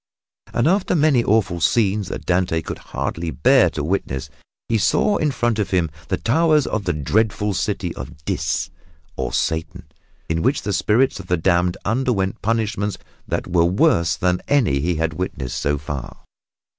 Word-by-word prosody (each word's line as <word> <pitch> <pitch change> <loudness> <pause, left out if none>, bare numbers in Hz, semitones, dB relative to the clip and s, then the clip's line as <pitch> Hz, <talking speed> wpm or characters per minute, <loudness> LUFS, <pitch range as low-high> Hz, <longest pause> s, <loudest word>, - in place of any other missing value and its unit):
And 120 - +1
after 185 +1 +2
many 145 -6 +3
awful 105 -6 +1
scenes 105 0 +2
that - - -6
Dante 90 -3 +1
could - - -6
hardly 85 0 -4
bear 130 +9 +4
to 75 - -4
witness, 75 -5 -2 0.4
he 115 -1 +1
saw 205 - +2
in 155 - +1
front 120 -4 0
of 105 - 0
him 85 -5 +1 0.2
the - - 0
towers 155 +3 +3
of 105 -2 -2
the 90 - +1
dreadful 105 +7 0
city - - -2
of 75 - -10
Dis, 75 +1 -1 0.4
or - - -3
Satan, 80 0 -2 0.4
in 80 0 -1
which 135 - +1
the 100 - -2
spirits 110 +7 +2
of - - -9
the 90 - +1
damned 90 +1 +1
underwent 110 -3 0
punishments 105 -3 -1 0.3
that - - -2
were 85 -1 +2
worse 90 - +3
than 90 0 0
any 115 - +2
he 85 +4 0
had 80 0 -1
witnessed 70 -7 -4
thus 75 0 0
far. 70 -3 -6
95 Hz, 170 wpm, -21 LUFS, 85-115 Hz, 0.4 s, bear